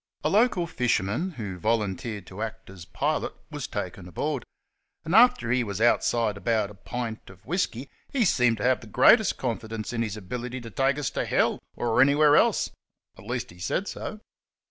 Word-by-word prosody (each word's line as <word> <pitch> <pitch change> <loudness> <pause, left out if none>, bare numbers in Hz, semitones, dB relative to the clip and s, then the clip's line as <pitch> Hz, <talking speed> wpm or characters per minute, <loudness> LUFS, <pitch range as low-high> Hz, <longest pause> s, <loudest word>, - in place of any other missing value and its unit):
A - - +2
local 210 -5 +3
fisherman, 125 - 0
who 100 - -6
volunteered 105 0 -1
to 95 +4 -9
act 110 -2 -6
as 90 -3 -11
pilot, - - -2 0.2
was - - -4
taken 90 -2 -5
aboard, 135 - -2 0.6
and 165 - -2
after 220 - +5
he 125 -1 +2
was 100 -3 -4
outside 115 -2 +2
about 110 -1 0
a - - -11
pint 110 +2 -6
of 95 0 -16
whisky 145 -6 -2 0.2
he 250 -5 +2
seemed 125 - +3
to - - -5
have 130 0 +2
the 115 - -11
greatest 215 - +5
confidence 115 -2 -4
in 115 - -1
his 110 -2 -2
ability 120 +6 -5
to 115 -1 -9
take 135 +4 +1
us 145 -4 -2
to - - -1
hell, - - +1 0.2
or 120 0 +2
any 140 +2 +5
where 150 -1 +5
else - - +3 0.4
at 95 - -14
least, 120 -3 -3
he 90 - -16
said 185 - -1
so. 215 - -6
115 Hz, 190 wpm, -26 LUFS, 105-135 Hz, 0.6 s, after